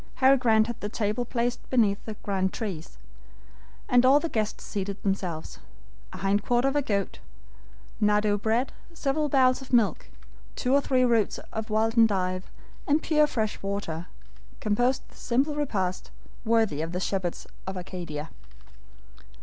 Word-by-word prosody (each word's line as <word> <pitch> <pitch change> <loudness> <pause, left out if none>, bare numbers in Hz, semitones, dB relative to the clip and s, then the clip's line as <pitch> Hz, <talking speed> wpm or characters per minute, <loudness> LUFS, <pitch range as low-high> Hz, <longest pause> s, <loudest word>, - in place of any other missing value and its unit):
Harry 265 +1 +6
Grant 225 -4 +4
had 235 0 -5
the 205 - -4
table 215 +3 -1
placed 240 0 -2
beneath 215 -5 +2
the 220 - -5
grand 190 -2 0
trees, 185 -8 -5 0.9
and 245 0 +5
all 270 +3 +6
the 330 - -3
guests 215 -4 -2
seated 200 -1 -4
themselves. 185 -5 -3 0.5
A - - -8
hind 195 +1 +1
quarter 245 +2 +2
of 275 - 0
a 290 - +3
goat, 200 -7 -2 0.8
nardou 210 0 +2
bread, 230 +4 +1 0.2
several 300 0 0
bowls 260 -1 +4
of 265 - -11
milk, 215 - +2 0.5
two 250 - 0
or 280 - +5
three 255 -2 +2
roots 230 -4 +2 0.2
of 220 0 -4
wild 220 +2 +1
endive, 185 -4 +2 0.4
and 295 +2 +2
pure 305 -2 +4
fresh 220 -6 -2
water, 195 -4 -4 0.5
composed 245 +5 +1
the - - -20
simple 270 +5 0
repast, 200 -11 -2 0.4
worthy 220 -9 +2
of 165 +2 -4
the 180 - -1
shepherds 190 -2 -2 0.2
of 190 0 -4
Arcadia. 170 -4 -6
220 Hz, 150 wpm, -27 LUFS, 195-255 Hz, 0.9 s, Harry